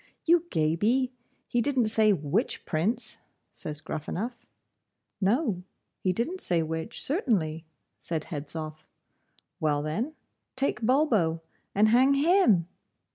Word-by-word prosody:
'You 340 0 +4
Gaby! 210 +12 +1 0.4
he 240 - +1
didn't 255 -1 +2
say 215 -1 +4
WHICH 185 - 0
Prince,' 175 +10 -1 0.3
says 150 0 -5
Gruffanuff. 200 +13 -5 0.7
'No; 205 - +1 0.4
he 185 - +1
didn't 305 - -2
say 170 -2 +2
which, 160 +7 -3
certainly,' 185 - +1 0.3
said 160 -2 -3
Hedzoff. 155 0 -6 0.7
'Well 145 -2 +1
then, 220 - -2 0.4
take 270 -1 0
Bulbo, 220 - +2 0.3
and 210 +2 +5
hang 260 +4 +5
HIM! 285 - +4
210 Hz, 110 wpm, -28 LUFS, 160-255 Hz, 0.7 s, and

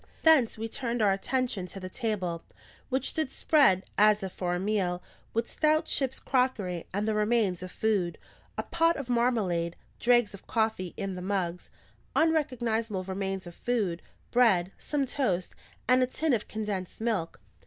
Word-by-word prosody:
Thence 295 -9 +5
we 225 +1 -3
turned 240 0 -3
our 210 -3 +4
attention 210 -1 -1
to 195 - -7
the 185 - -6
table, 185 -6 -2 0.5
which 260 0 0
stood 315 -4 -1
spread, 265 - +4 0.2
as 210 0 +5
if 190 - -3
for 175 -1 -2
a - - -2
meal, 190 -3 0 0.3
with 230 +1 -1
stout 310 +1 +2
ship's 265 -2 +1
crockery 215 -10 0
and 205 +3 -1
the 220 - +2
remains 210 -4 +1
of 185 0 -7
food 200 -6 0 0.4
a - - -1
pot 330 0 +2
of 275 -3 -6
marmalade, 210 -9 +1 0.2
dregs 240 -3 +4
of 200 - -12
coffee 220 -6 -1
in 195 -1 -3
the 180 - -6
mugs, 180 -2 -2 0.5
unrecognisable 235 - +1
remains 190 0 -3
of 175 - -9
foods, 205 -7 -1 0.3
bread, 195 -7 +4
some 290 -2 -1
toast, 190 -10 -1 0.3
and 255 +1 +5
a 255 - +3
tin 305 +3 0
of 220 - 0
condensed 210 -4 -4
milk. 215 -8 -1
215 Hz, 165 wpm, -29 LUFS, 185-250 Hz, 0.5 s, Thence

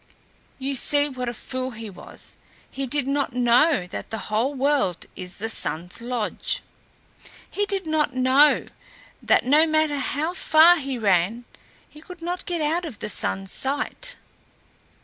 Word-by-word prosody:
You 275 +1 -3
see 290 +3 +3
what 250 -2 -4
a - - -5
fool 255 +3 -5
he 225 -2 -8
was; 195 - -12 0.4
he 270 0 -4
did 285 +1 +2
not 275 -1 -1
know 245 - +3
that - - -6
the 220 - -4
whole 240 +7 0
world 270 - 0
is 180 0 -7
the 225 - -4
Sun's 180 -3 -1
lodge. 240 -3 -2 0.8
He 410 0 -2
did 390 -3 0
not 310 -4 0
know 260 +4 +4 0.6
that, - - +3
no 300 +5 +5
matter 310 -2 +1
how 295 +5 -2
far 335 0 +6
he 275 -4 -4
ran, 205 +2 +1 0.4
he 300 - -16
could 345 +1 -12
not 355 +1 -4
get 345 -2 -2
out 320 +4 0
of 295 -11 -7
the 210 - -5
Sun's 195 -2 -2
sight. 290 - -1
275 Hz, 155 wpm, -24 LUFS, 235-310 Hz, 0.8 s, far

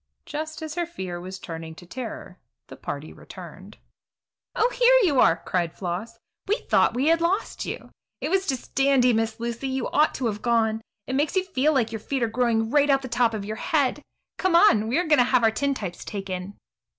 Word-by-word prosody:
Just 315 +1 -5
as 310 -1 -5
her 345 0 -2
fear 185 - -6
was 185 +1 -7
turning 165 -3 -8
to 175 - -13
terror 235 +6 -7 0.3
the - - -9
party - - -6
returned. - - -12 0.8
"Oh, 470 +3 +2
here - - +5
you 290 -9 +3
are!" 165 - +5
cried 175 -3 -1
Floss. 195 +6 -4 0.3
"We 415 - +3
thought 485 - +2
we 270 +5 +2
had 330 0 +3
lost 365 +5 -1
you. - - -6 0.3
It - - -3
was 385 0 +1
just 265 -3 -3
dandy, 270 -2 +4
Miss 225 0 -1
Lucy; 235 +3 -3
you 265 -2 -2
ought 305 +1 +3
to 260 - -3
have 210 -2 -2
gone. 225 -2 +1 0.2
It 260 - -4
makes 290 +6 0
you 375 - +3
feel 310 -5 +1
like 245 -6 +1
your 225 - -4
feet 265 +4 -2
are - - +2
growing 225 -1 +1
right 290 0 +4
out 275 - +6
of 270 - -3
the 260 - -6
top 235 -2 +2
of 200 -2 -4
your 215 +1 -5
head. 295 -3 0 0.4
Come 370 -2 +2
on; 280 - +5
we 240 - +1
are 355 - +1
going 300 -3 +4
to - - +7
have 250 -1 +2
our 225 - +5
tintypes 220 -8 -2
taken." 195 -1 -5
250 Hz, 215 wpm, -25 LUFS, 220-300 Hz, 0.8 s, to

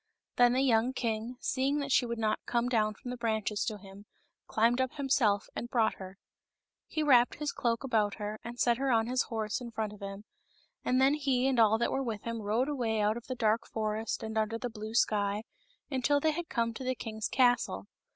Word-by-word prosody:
Then 245 0 +6
the 260 - +2
young 240 -1 +3
king, 230 0 -2
seeing 270 +3 0
that 280 -1 -2
she 250 - +4
would 235 0 -3
not 215 -1 0
come 240 0 +1
down 215 -3 +1
from 245 - -7
the 250 - -5
branches 220 -4 -1
to 215 - -3
him, 200 +1 -13 0.4
climbed 235 +3 +2
up 260 -1 -1
himself 250 -8 +1
and 240 - -4
brought 230 -3 +2
her. 190 0 -9 0.7
He 310 - -1
wrapped 250 -5 +5
his 300 -1 -2
cloak 230 0 -1
about 220 -6 +1
her 210 0 -5
and 240 +1 -8
set 240 -1 +3
her 270 +1 0
on 225 -1 +3
his 250 +2 +1
horse 220 +1 -3
in 240 - -6
front 220 -2 -3
of 210 - -13
him, 200 +1 -7 0.6
and 255 +1 +2
then 270 +2 +5
he 270 -4 +1
and 260 -3 +1
all 220 -1 +5
that 235 - 0
were 270 - 0
with 225 -6 -4
him 230 -1 -4
rode 220 +6 0
away 240 -7 -1
out 210 +1 +2
of 235 - -8
the 255 - -3
dark 225 -1 +1
forest 215 0 -2
and 220 0 -2
under 220 +1 -1
the 245 +1 -4
blue 215 0 -7
sky, 205 -2 +1 0.5
until 275 +2 +2
they 315 +2 +2
had 340 +2 -5
come 230 -1 0
to 245 - -7
the 255 0 -1
king's 220 -2 -4
castle. 245 - +2
230 Hz, 220 wpm, -31 LUFS, 215-255 Hz, 0.7 s, Then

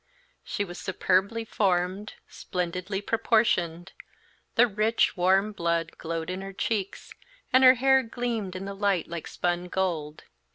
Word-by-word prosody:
She 205 - -3
was 175 -1 -9
superbly 195 +4 0
formed, 190 0 -1
splendidly 185 +2 -4
proportioned; 190 -6 +1 0.6
the 240 - +6
rich, 220 +1 +1
warm 190 +3 +3
blood 170 -4 -1
glowed 165 +1 -4
in 185 +1 -4
her 195 0 -7
cheeks, 200 0 -3 0.4
and 260 +1 +6
her 255 0 +9
hair 265 +2 +4
gleamed 230 -5 -3
in 185 +1 -5
the 200 - -5
light 195 -4 0
like 170 -1 -6
spun 175 0 -2
gold. 165 -5 -2
190 Hz, 135 wpm, -27 LUFS, 175-215 Hz, 0.6 s, her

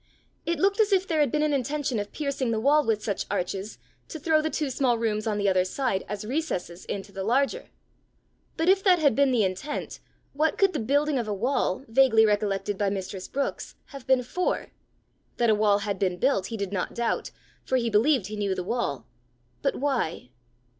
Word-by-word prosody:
It 340 0 +1
looked 395 +7 +2
as 430 -1 +3
if 385 -1 +2
there 320 -3 0
had 290 -5 +3
been 300 0 +1
an 305 -1 +1
intention 275 -2 -1
of 205 0 -5
piercing 280 -4 -2
the 225 -1 0
wall 290 +6 +4
with 220 -4 0
such 200 -3 -2
arches, 195 +1 -3 0.3
to - - -7
throw 310 +1 +2
the 315 - -1
two 295 -2 -2
small 250 -2 +1
rooms 220 -1 -1
on 210 -2 0
the 205 -1 0
other 185 -1 +3
side 195 +1 -1
as 210 0 -4
recesses 215 - -3
into 200 0 -5
the 195 -1 -5
larger. 275 - 0 0.9
But 325 - 0
if 385 +1 +4
that 370 -3 +5
had 295 -6 +3
been 280 -1 +4
the 235 -4 +3
intent, 190 +10 -3 0.3
what 305 +2 +1
could 390 -1 +3
the 305 - -1
building 285 +4 +1
of 235 - -3
a 210 - -1
wall, 260 +5 -1
vaguely 225 -2 +5
recollected 205 -1 0
by 205 -1 +2
mistress 190 -1 -5
Brookes, 275 0 -3 0.2
have 275 -2 -10
been 260 -1 +4
for? 360 +9 -2 0.7
That 235 -2 +3
a - - +5
wall 210 -1 +3
had 200 -2 -3
been 180 -2 0
built 220 -5 +1
he 225 - -5
did 200 -1 -4
not 185 - -3
doubt, 235 -1 -1 0.3
for 260 - -1
he 235 -2 -1
believed 235 +1 +3
he 210 +2 -6
knew 200 -2 -1
the 180 - -3
wall, 200 - -2 0.6
but - - 0
why? 245 - -2
235 Hz, 210 wpm, -26 LUFS, 205-290 Hz, 0.9 s, that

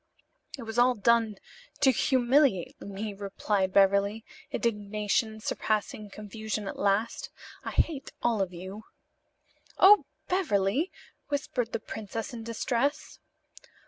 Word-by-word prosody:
"It 255 - -7
was 225 +1 -2
all 250 +1 +5
done 225 0 +3 0.5
to 265 - +6
humiliate 255 - +2
me," 200 +1 -5
replied 195 -1 -1
Beverly, 200 +2 +3 0.2
indignation 215 0 -1
surpassing 215 -1 -2
confusion 215 0 -5
at - - -6
last. 205 +3 0 0.3
"I - - -4
hate 285 -5 0
all 230 -4 +2
of 190 -2 -1
you." 190 +5 -8 0.9
"Oh, 410 +2 +8 0.2
Beverly!" 290 - +1 0.4
whispered 280 -5 -2
the 230 - -2
princess, 220 +1 -6
in 235 - -6
distress. 240 +5 -1
220 Hz, 110 wpm, -29 LUFS, 200-245 Hz, 0.9 s, Oh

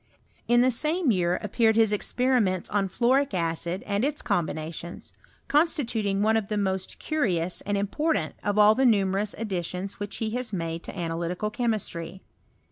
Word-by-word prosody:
In 240 0 +5
the 255 +1 +4
same 305 +4 +1
year 180 -3 +1
appeared 220 +2 +2
his 220 -2 +4
experiments 215 -4 +1
on 200 -1 +1
fluoric 255 +5 +2
acid 170 +1 -1
and 205 +2 -1
its 290 +2 -1
combinations, 170 -3 -3 0.3
constituting 235 - +1
one 220 +1 +3
of 220 -3 0
the 210 - -2
most 190 -2 -2
curious 185 - -1
and 205 0 +1
important 295 +11 0
of 205 0 0
all 210 0 +7
the 265 - +1
numerous 200 -3 +2
ad 225 -1 -5
ditions 180 +1 -3
which 205 0 -4
he 220 -1 -2
has 245 -1 -3
made 165 -3 -3
to - - -8
analytical 175 +4 -2
chemistry. 190 -7 -2
205 Hz, 160 wpm, -26 LUFS, 180-235 Hz, 0.3 s, all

